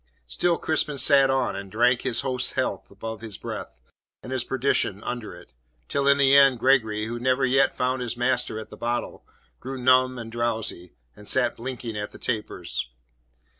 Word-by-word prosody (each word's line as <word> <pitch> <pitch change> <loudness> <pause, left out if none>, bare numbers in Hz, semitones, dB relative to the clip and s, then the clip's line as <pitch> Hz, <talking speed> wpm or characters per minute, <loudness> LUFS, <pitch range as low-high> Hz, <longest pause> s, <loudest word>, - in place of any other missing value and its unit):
Still 170 - 0
Crispin 155 -2 0
sat 135 +1 +5
on, 130 -5 0
and 100 0 -7
drank 120 +3 +3
his 120 - 0
host's 130 -2 -1
health - - -2
above 110 -1 -7
his 110 -3 -5
breath, - - -7 0.5
and 125 - -8
his 130 -2 -1
perdition 125 -6 0
under 120 -7 -5
it, 85 -8 -16 0.3
till 140 0 0
in 140 0 +6
the 140 -1 +5
end 135 -2 +6
Gregory, 110 -5 +2
who 120 +2 -5
never 130 +2 +2
yet 135 +1 +4
had - - -26
found 125 0 0
his 120 -1 -4
master 125 -2 0
at 110 - -8
the - - -9
bottle, 120 +1 -3 0.4
grew 130 +1 -6
numb 130 0 +4
and 115 -1 -7
drowsy, 115 -6 -3 0.2
and 105 0 -13
sat 125 +2 +2
blinking 120 -2 -6
at 105 0 -4
the - - -10
tapers. 110 - -3
125 Hz, 185 wpm, -25 LUFS, 110-130 Hz, 0.5 s, in